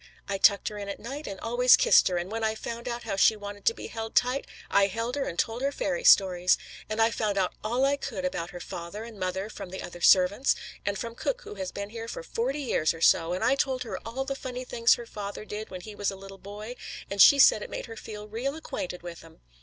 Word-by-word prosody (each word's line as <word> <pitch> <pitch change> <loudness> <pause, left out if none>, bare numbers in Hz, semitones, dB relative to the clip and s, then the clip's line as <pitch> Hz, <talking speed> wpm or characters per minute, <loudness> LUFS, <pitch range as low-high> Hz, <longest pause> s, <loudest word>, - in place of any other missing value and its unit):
I 195 -1 -2
tucked 200 0 +4
her 210 -1 -7
in 200 0 -5
at 200 - -5
night 275 +6 -7
and 195 -1 -6
always 245 +2 +5
kissed - - +6
her, 180 - 0
and 175 +3 -4
when 225 0 -3
I 220 0 +1
found 235 +2 -6
out 240 0 -4
how - - -3
she 220 +3 +5
wanted 205 -1 -9
to 230 - +4
be - - -8
held 225 -1 -6
tight, 250 +3 +2 0.2
I 200 0 +4
held 230 +5 -3
her 280 - -1
and 170 - -5
told 225 +6 -1
her 275 +1 +1
fairy - - -2
stories. 185 - +5 0.3
And 215 +1 -3
I 225 +1 +4
found 210 -3 -1
out 185 -2 +1
all 240 +5 +1
I 280 +1 +2
could 275 0 -4
about 175 -11 -2
her 175 - -8
father 175 +5 -7
and 225 -3 -10
mother 185 +2 -2
from 200 -3 -8
the 190 - -6
other 175 0 -9
servants, 195 +10 +5 0.3
and 200 0 0
from 230 +2 -5
cook - - -3
who - - -8
has 190 -2 -5
been 200 +1 -6
here 230 0 -6
for 200 - -6
forty 260 - -2
years 165 - +1
or 165 - -11
so, 165 +1 +4
and 185 - -2
I 260 - +4
told 265 -2 0
her 215 -6 -5
all 255 +4 -4
the 275 - -2
funny 255 -2 -6
things 230 -1 +3
her 240 - -8
father 205 -1 -7
did 215 +1 -6
when 185 -1 -7
he 215 +3 -9
was 205 -1 -1
a 195 - -5
little 195 0 -11
boy, 210 +5 -8 0.3
and 200 0 +2
she 280 - +9
said 265 -5 +7
it - - -6
made - - -5
her 225 - -9
feel 210 -1 -8
real 245 +7 -3
acquainted 180 - -6
with 170 -1 -8
'em. - - -17
215 Hz, 265 wpm, -28 LUFS, 195-245 Hz, 0.3 s, she